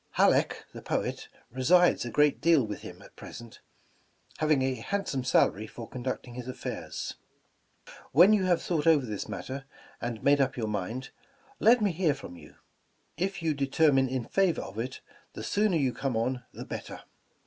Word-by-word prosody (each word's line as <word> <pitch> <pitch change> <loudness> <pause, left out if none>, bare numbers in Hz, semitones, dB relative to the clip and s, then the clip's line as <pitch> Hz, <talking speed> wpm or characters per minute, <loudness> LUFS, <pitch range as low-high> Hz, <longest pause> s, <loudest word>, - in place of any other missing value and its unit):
Halleck, - - +3
the - - -8
poet, - - -3 0.2
resides 170 +6 +4
a - - -3
great 150 +4 +3
deal 165 -7 +4
with 105 -1 -6
him - - -10
at - - -17
present, 115 0 -11 0.8
having 155 -3 +3
a 130 0 +1
handsome 135 - -2
salary 110 -4 +2
for 115 +1 -9
conducting 125 -1 -5
his 125 0 -7
affairs. 130 - -5 0.9
"When 175 +9 +7
you 200 -3 +3
have 175 -2 +2
thought 165 -3 -1
over 150 -5 +5
this 105 -4 -5
matter, 135 +1 -6 0.4
and 120 -2 -4
made 140 0 +5
up 130 -1 0
your 115 - -1
mind, 105 +5 -4 0.5
let 230 0 +5
me 200 - +3
hear 165 -4 +1
from 135 -10 -10
you. 80 -4 -14 0.6
If 190 -1 -2
you 160 -2 +2
determine 140 -1 +3
in 130 -2 -2
favor 190 -4 +1
of 100 +3 -8
it, 125 +3 -4 0.3
the - - -7
sooner 205 -4 +2
you 135 -5 +1
come 130 -1 -2
on 125 +2 -1
the - - -8
better. - - -7
135 Hz, 170 wpm, -29 LUFS, 120-165 Hz, 0.9 s, When